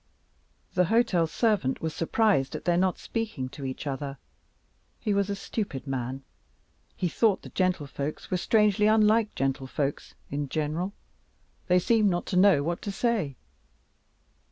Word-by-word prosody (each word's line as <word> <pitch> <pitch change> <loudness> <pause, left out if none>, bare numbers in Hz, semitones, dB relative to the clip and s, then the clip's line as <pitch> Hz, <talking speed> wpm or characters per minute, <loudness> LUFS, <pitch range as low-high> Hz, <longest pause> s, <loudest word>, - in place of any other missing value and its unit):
The 180 - +3
hotel 195 -5 +2
servant 195 - +1
was 160 -1 -3
surprised 170 -4 +1
at - - -6
their 175 -1 +3
not 185 +1 +2
speaking 220 - -4
to 140 +1 -9
each 130 +3 -5
other. 140 0 -4 0.8
He 210 - 0
was 200 0 +1
a 200 - -1
stupid 195 - -4
man; 135 0 -3 0.7
he 180 - 0
thought 205 +3 +2
the - - -9
gentlefolks 155 -5 -2
were 185 - +2
strangely 210 +1 +3
unlike 215 0 +4
gentlefolks 135 +1 -2 0.2
in 145 0 -2
general; 160 +6 -2 0.7
they 180 - +4
seemed 215 +3 +3
not 175 -1 -1
to - - +2
know 185 -6 +5
what 170 +3 -2
to 205 - -4
say. 195 - 0
180 Hz, 145 wpm, -27 LUFS, 140-210 Hz, 0.8 s, know